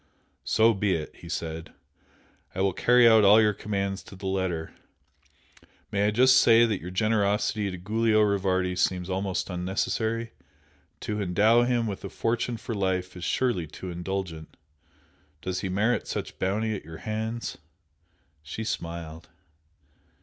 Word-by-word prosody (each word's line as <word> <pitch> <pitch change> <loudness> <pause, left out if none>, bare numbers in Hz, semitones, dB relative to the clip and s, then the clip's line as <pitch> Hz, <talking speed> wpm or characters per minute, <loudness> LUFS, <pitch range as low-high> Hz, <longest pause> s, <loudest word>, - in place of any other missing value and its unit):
"So 115 +1 +4
be 100 -1 +1
it!" 80 -2 -6
he 85 - -11
said 80 0 -5 0.8
"I 95 - -1
will 95 -1 +2
carry 125 +3 +5
out 110 -2 +6
all 105 +2 +7
your 105 -1 +4
commands 100 -1 -3
to - - -12
the 95 +1 -10
letter! 95 -4 -2 1.2
May 100 0 +1
I - - +4
just 125 +4 +5
say 115 -1 +6
that 110 -4 -2
your 90 - -6
generosity 105 +1 +1
to 95 - -6
Giulio 110 +4 +1
Rivardi 95 -3 +1
seems 90 0 0
almost 95 0 -2
unnecessary? 110 +5 -2 0.7
To 105 0 -3
endow 105 +6 +4
him 120 -2 +1
with 100 -3 -5
a 100 - -5
fortune 115 +2 -1
for 115 - -6
life 95 -3 -1
is 90 - -8
surely 110 -11 0
too 90 +5 -8
indulgent! 90 -2 -5 0.8
Does 90 +2 -3
he 95 - -3
merit 110 +6 0
such - - -5
bounty 110 +4 0
at 95 - -7
your 80 0 -10
hands?" 110 +2 -3 0.8
She 75 +9 -6
smiled. 85 -5 -5
100 Hz, 150 wpm, -27 LUFS, 90-110 Hz, 1.2 s, all